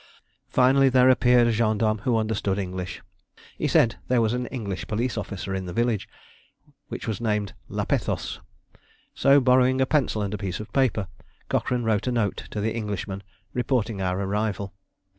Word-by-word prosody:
Finally 135 +1 +4
there 130 0 +6
appeared 125 -1 +4
a 120 - +3
gendarme 110 -1 +1
who 120 +2 +1
understood 110 -3 -1
English. 90 -2 -5 0.6
He - - +1
said 115 - +3
there 125 -1 +3
was 110 0 +2
an 125 0 -2
English 100 -8 -5
police 115 +4 -1
officer 100 -2 -4
in 95 -1 -3
the 90 - -5
village, 115 -4 0 0.8
which - - -6
was 110 -2 -3
named 105 -3 -1 0.2
Lapethos; - - -2 0.7
so 140 +1 +5
borrowing 130 0 +4
a 130 - +4
pencil 130 -7 +1
and 100 0 -3
a 105 - -3
piece 95 -3 -3
of 110 - -9
paper, 120 -7 +1 0.4
Cochrane 125 -1 0
wrote 110 0 0
a - - +1
note 115 -5 -1
to 105 - -4
the 110 +2 -1
Englishman 105 -3 -4 0.3
reporting 120 -5 0
our 90 0 -1
arrival. 100 -1 -2
110 Hz, 165 wpm, -25 LUFS, 100-125 Hz, 0.8 s, there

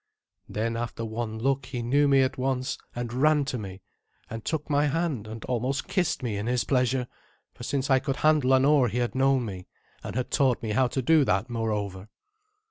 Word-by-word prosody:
Then, 115 +2 -2
after 115 -1 -4
one 110 0 -4
look, 135 +2 0
he 125 -3 -4
knew 140 +5 +3
me 135 -1 +5
at 130 - -1
once, 130 0 -1 0.2
and 120 -1 -4
ran 150 +2 +3
to 130 -3 -3
me, 95 -2 -8 0.5
and 115 0 -6
took 160 -2 -2
my 145 0 +2
hand, 145 -8 -1
and 110 +1 -8
almost 125 +3 -2
kissed 175 -8 0
me 110 -5 -2
in 105 +3 -3
his 125 -1 +1
pleasure, 125 -1 +1 0.5
for - - -16
since 140 -1 -1
I 130 - +5
could 135 0 -2
handle 150 -4 +3
an 130 0 +4
oar 145 -3 +4
he 115 - -3
had 120 -1 0
known 130 -1 +2
me, 95 -4 -7 0.4
and - - -6
had 125 0 -2
taught 130 -4 +2
me 110 - -2
how 130 +4 +3
to 130 +1 -3
do 160 +3 +5
that, 100 +4 0
moreover. 105 -4 -3
125 Hz, 210 wpm, -27 LUFS, 115-135 Hz, 0.5 s, me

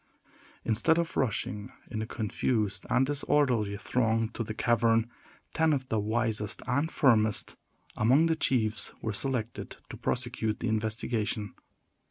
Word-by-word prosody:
Instead 125 +9 +3
of 170 -1 -1
rushing 110 -3 -1 0.2
in 110 -2 -2
a 110 - -4
confused 105 -3 -1
and 125 +1 +3
disorderly 130 -7 +1
throng 115 -1 +1
to 115 - -4
the 110 -1 -5
cavern, 115 -1 +3 0.5
ten 160 -1 +3
of 130 -2 -2
the 110 - +1
wisest 110 -1 -1
and 140 +7 0
firmest 110 -6 +2 0.4
among 130 +9 +4
the 165 -1 +2
chiefs 110 -8 0
were 110 - -1
selected 120 0 -3
to - - -7
prosecute 120 -3 -1
the 120 - -2
investigation. 110 -1 -1
115 Hz, 135 wpm, -29 LUFS, 110-130 Hz, 0.5 s, among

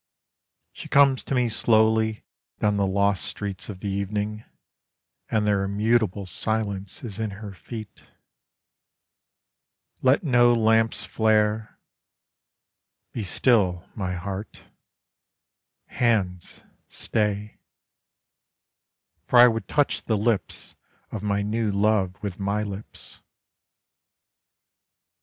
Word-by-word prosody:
She - - -10
comes 140 -2 +4
to 135 - -2
me 125 -1 +2
slowly 110 -1 +2 0.4
down 105 -1 +1
the 100 -1 +1
lost 100 0 +1
streets 100 -1 -5
of 95 -2 -8
the 100 - -3
evening, 105 +2 -3 0.9
And 110 -1 +1
their 100 -2 +2
immutable 105 0 0
silence 100 0 -1
is 110 -3 -6
in 110 -1 -1
her 105 -1 -8
feet. 110 +2 -9 2.0
Let 130 +5 +3
no 120 -5 +4
lamps 110 0 +2
flare 110 -1 +1 1.4
be 115 - -3
still, 95 -3 +1
my 95 -4 -3
heart 95 +3 -6 1.2
hands, 95 -8 -1 0.2
stay: 105 -1 -2 1.7
For 125 - +3
I 120 +1 +10
would 115 -5 -2
touch 145 -1 +1
the 110 - +1
lips 105 -2 -2 0.4
of 110 - -5
my 100 -1 0
new 110 +1 -1
love 100 -2 +1
with 100 -2 -5
my 100 +2 -1
lips. 100 0 -9
105 Hz, 100 wpm, -25 LUFS, 100-110 Hz, 2.0 s, I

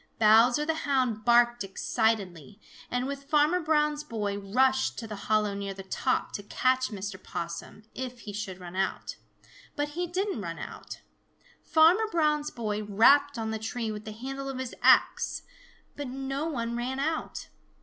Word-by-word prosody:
Bowser 230 +6 +5
the 320 - +1
Hound 260 -8 0
barked 240 -1 +4
excitedly, 195 -2 -1 0.3
and 245 +1 -1
with 280 0 -5
Farmer 300 +4 +3
Brown's 300 -2 +1
boy 210 -7 -3
rushed 260 +7 +1
to 230 - -5
the 215 -1 -6
hollow 215 -1 +2
near 200 -1 -4
the 195 - -8
top 255 +7 -1
to - - -5
catch 255 +5 +1
Mr. 200 -2 -6
Possum, 170 +5 -6
if 250 -2 -6
he 205 - -8
should 195 -3 -5
run 180 0 -9
out. 190 0 -2 0.6
But 290 -1 -1
he 350 +4 -3
didn't 380 - -2
run 165 -3 -5
out. - - -8 0.6
Farmer 350 +8 +4
Brown's 300 -2 +1
boy 215 -3 -3
rapped 255 +7 +4
on 220 -1 -2
the 220 - -3
tree 225 +1 -3
with 210 0 -7
the 215 - -6
handle 270 +5 -6
of 270 - -5
his 260 -2 -5
axe, - - +3 0.5
but 290 -1 -5
no 270 +3 -3
one 235 -6 -3
ran 250 +3 -3
out. 315 +3 -3
240 Hz, 165 wpm, -28 LUFS, 210-285 Hz, 0.6 s, Bowser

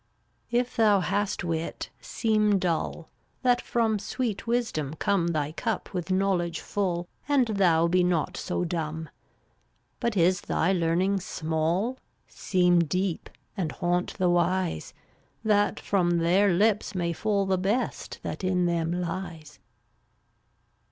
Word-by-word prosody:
326 245 +1 +1
If - - -17
thou 210 -3 +5
hast 200 +4 -1
wit, 165 -1 -3
seem 215 -3 +2
dull, 170 -2 -2 0.4
That 245 -1 +3
from 225 -3 0
sweet 230 0 -3
Wisdom 220 - -1
come 180 0 +1
Thy 155 -3 -1
cup 220 +7 -3
with 180 -1 -3
knowledge 185 -3 +1
full, 175 -4 -2 0.2
And 265 -5 +3
thou 175 -5 +3
be 180 +1 +3
not 175 0 0
so 180 - -2
dumb. 160 -2 -3 0.9
But 235 -4 -1
is 180 +1 +3
thy 180 +4 +1
learning 180 +3 +1
small, 170 +8 -1 0.3
Seem 180 -2 +2
deep, 175 +2 -1 0.3
and 175 -7 -2
haunt 175 0 -1
the 180 -3 +2
wise, 175 - 0 0.5
That 205 -2 +2
from 175 -3 +1
their 180 +4 +3
lips 210 +2 +2
may 170 -2 0
fall 200 +2 0
The 190 -1 +1
best 205 +7 -2
that - - -5
in 185 -1 +2
them 170 -1 0
lies. 175 -3 -5
180 Hz, 130 wpm, -27 LUFS, 170-205 Hz, 0.9 s, thou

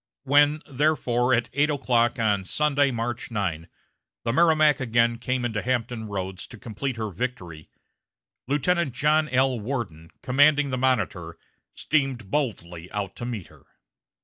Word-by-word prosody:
When, 145 +2 +3
therefore, 130 -4 +1
at 120 0 -2
eight 145 +3 +2
o'clock 125 -5 +1
on 105 -4 +1
Sunday, 145 +6 +2
March 120 -1 -3
9, 90 -7 -3 0.5
the 115 - -1
Merrimac 155 -2 +4
again 115 -2 +1
came 125 0 -1
into 110 -3 -2
Hampton 120 -2 -2
Roads 95 -2 -5
to 120 - -12
complete 120 +4 -5
her 110 -2 -3
victory, 90 -7 -5 0.8
Lieutenant 150 +1 +1
John 150 +2 +2
L. 130 -1 +2
Worden, 100 - -5
commanding 145 +2 +4
the 130 - -1
Monitor, 100 -10 -1 0.4
steamed 135 -9 -1
boldly 90 - -3
out 100 -2 -4
to 120 - -5
meet 115 -7 -5
her. - - -19
120 Hz, 140 wpm, -25 LUFS, 105-140 Hz, 0.8 s, Merrimac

